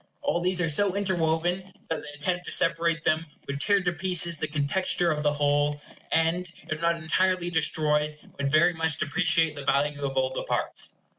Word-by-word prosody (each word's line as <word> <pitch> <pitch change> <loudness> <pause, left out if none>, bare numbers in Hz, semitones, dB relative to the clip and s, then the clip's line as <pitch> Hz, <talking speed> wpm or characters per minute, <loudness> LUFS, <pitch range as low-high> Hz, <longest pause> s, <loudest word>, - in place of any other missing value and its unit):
All 170 - 0
these 180 +1 +1
are 175 - +1
so 190 +5 +3
interwoven 180 -1 -1 0.2
that 160 - -1
the 150 - -9
attempt 180 +4 -1
to - - -1
separate 165 0 +2
them 160 +1 +1 0.2
would 140 0 -4
tear 200 +2 +3
to 175 -1 0
pieces 170 0 0
the - - -3
contexture 160 +4 0
of 150 -1 -2
the 150 -1 +1
whole; 145 0 +1 0.3
and, 165 +2 +1 0.2
if 155 0 -3
not 170 0 +2
entirely 175 +2 +1
destroy, 150 -2 +1 0.2
would 140 -1 0
very 155 +4 +4
much 160 -2 -1
depreciate 165 0 +1
the 145 - -7
value 145 +1 0
of 135 -1 -3
all 130 0 +1
the - - -4
parts. - - -1
160 Hz, 190 wpm, -26 LUFS, 150-175 Hz, 0.3 s, very